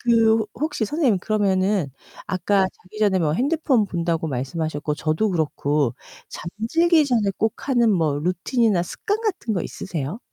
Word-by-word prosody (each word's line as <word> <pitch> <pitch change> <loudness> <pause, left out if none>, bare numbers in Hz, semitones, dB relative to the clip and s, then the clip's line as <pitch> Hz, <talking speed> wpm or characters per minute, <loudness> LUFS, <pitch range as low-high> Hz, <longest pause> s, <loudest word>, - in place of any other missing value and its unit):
그 225 -2 +3
혹시 295 -2 -2
선생님 260 - +1
그러면은 195 -5 +1 0.4
아까 195 +1 +1 0.2
자기 200 +4 -13
전에 200 -3 +3
뭐 155 -3 +1
핸드폰 270 - +1
본다고 170 -3 -1
말씀하셨고 150 +3 -2
저도 160 +8 0
그렇고 150 -5 0 0.3
잠들기 310 - +1
전에 225 -6 +2
꼭 220 +5 -2
하는 240 -4 +4
뭐 160 -6 +1
루틴이나 185 - +1
습관 410 - -3
같은 365 - -2
거 180 - -1
있으세요? 165 - -5
200 Hz, 320 characters per minute, -23 LUFS, 165-235 Hz, 0.4 s, 하는